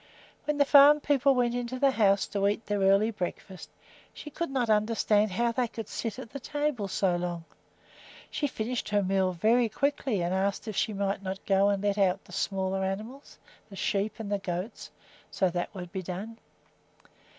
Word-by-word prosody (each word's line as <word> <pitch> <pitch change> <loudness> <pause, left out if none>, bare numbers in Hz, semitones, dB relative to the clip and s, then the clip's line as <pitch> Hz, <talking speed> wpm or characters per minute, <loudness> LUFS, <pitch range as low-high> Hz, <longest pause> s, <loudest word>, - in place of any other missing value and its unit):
When 300 -1 -1
the 285 - +4
farm 290 +1 +7
people 280 -2 +2
went 240 -1 +1
into 245 +1 -3
the 275 +1 +3
house 200 -5 +3
to 200 -1 +1
eat 205 +2 -1
their 205 -1 -1
early 195 +3 +4
breakfast, 185 -1 -6 0.5
she 300 - -9
could 335 +4 -3
not 260 -3 0
understand 215 -1 +2
how 235 +5 0
they 245 +1 0
could 225 -2 -7
sit 225 -3 -4
at 225 - -9
the 275 - -6
table 290 -6 -2
so 190 -1 +1
long. 175 -1 -3 0.9
She 290 - -1
finished 235 -2 -3
her 205 -1 +2
meal 190 0 +1
very 225 +6 +2
quickly 270 -5 -1
and 175 +1 -1
asked 195 +3 -1
if 215 - -4
she 220 - 0
might 200 -1 -2
not 190 0 -6
go 195 0 +3
and 200 -1 -1
let 205 0 0
out 195 0 +1
the - - -16
smaller 190 -1 -1
animals, 215 +9 -5 0.3
the 200 - -11
sheep 200 +2 -1
and 215 -2 -6
the 205 - 0
goats, 185 +3 -5 0.4
so 190 - +1
that - - -10
that 175 +3 -3
would 180 -2 -7
be 190 -1 -4
done. 195 +6 -7
205 Hz, 195 wpm, -28 LUFS, 195-240 Hz, 0.9 s, farm